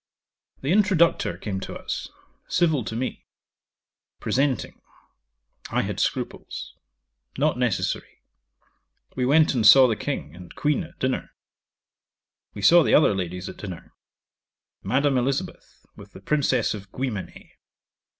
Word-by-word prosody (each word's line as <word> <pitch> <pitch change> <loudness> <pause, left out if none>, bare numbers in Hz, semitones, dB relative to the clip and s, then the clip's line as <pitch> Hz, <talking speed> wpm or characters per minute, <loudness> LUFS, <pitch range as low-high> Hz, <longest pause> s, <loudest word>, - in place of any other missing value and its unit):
'The 135 - -1
introductor 180 - +3
came 95 -2 -4
to - - -7
us; - - -5 0.4
civil 160 -7 +1
to 110 - -5
me. 130 +3 -4 0.9
Presenting. 135 -2 -1 0.9
I - - 0
had - - -4
scruples. - - -3 0.6
Not 145 -2 +1
necessary. 120 -6 -2 0.9
We 125 -1 0
went 155 +3 +4
and 120 -4 0
saw 130 +3 +9
the 115 - 0
King 105 - -5
and 90 0 -12
Queen 150 +4 0
at 165 - -14
dinner. 130 0 -2 1.2
We 100 - -7
saw 175 +10 +7
the - - +3
other 150 - +5
ladies 90 0 -4
at - - -8
dinner 95 -5 -9 0.9
Madame 135 +5 +1
Elizabeth, 135 +2 -4
with - - -14
the - - -11
Princess 145 -4 +1
of 100 -2 -9
Guimené. 120 -7 -5
130 Hz, 125 wpm, -24 LUFS, 100-145 Hz, 1.2 s, saw